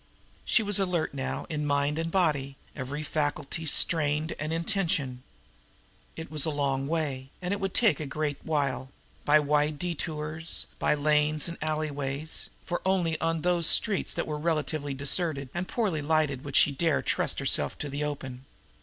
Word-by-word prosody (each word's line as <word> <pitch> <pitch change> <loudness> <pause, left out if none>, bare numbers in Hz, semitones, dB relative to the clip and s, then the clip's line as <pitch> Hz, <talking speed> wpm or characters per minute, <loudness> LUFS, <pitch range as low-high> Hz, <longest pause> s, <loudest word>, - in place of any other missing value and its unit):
She 230 - +3
was 205 -1 +3
alert 180 -6 0
now 135 -1 -3
in 150 -1 -2
mind 145 +1 +1
and 165 0 -1
body, 150 -7 +1 0.2
every 145 +2 -4
faculty 150 +1 -2
strained 150 +1 +2
and 155 +1 -2
in 165 +1 -1
tension. 165 - 0 0.9
It 160 0 -7
was 150 -3 +2
a - - +1
long 140 -2 0
way, 140 -5 -2
and 180 +1 -2
it 200 - -2
would 195 -1 -3
take 225 -7 +4
a 155 - -4
great 145 0 -2
while 135 -4 -1 0.4
by 150 +1 +6
wide 150 0 +1
detours, 160 -1 -1
by - - +3
lanes 150 0 +2
and 170 - -6
alleyways, 150 -1 -2 0.2
for 175 - -2
only 180 -4 +1
on 165 -1 0
those 175 -1 +2
streets 210 -5 +2
that - - -1
were 150 -1 -3
relatively 155 -3 -1
deserted 140 0 0
and 175 +1 -3
poorly 195 -10 0
lighted 145 -3 +1
would 140 -2 -6
she 150 - +6
dare 155 +1 +1
trust - - 0
herself - - 0
to 145 - -3
the 145 +1 -3
open. 135 -3 -5
155 Hz, 170 wpm, -28 LUFS, 145-165 Hz, 0.9 s, by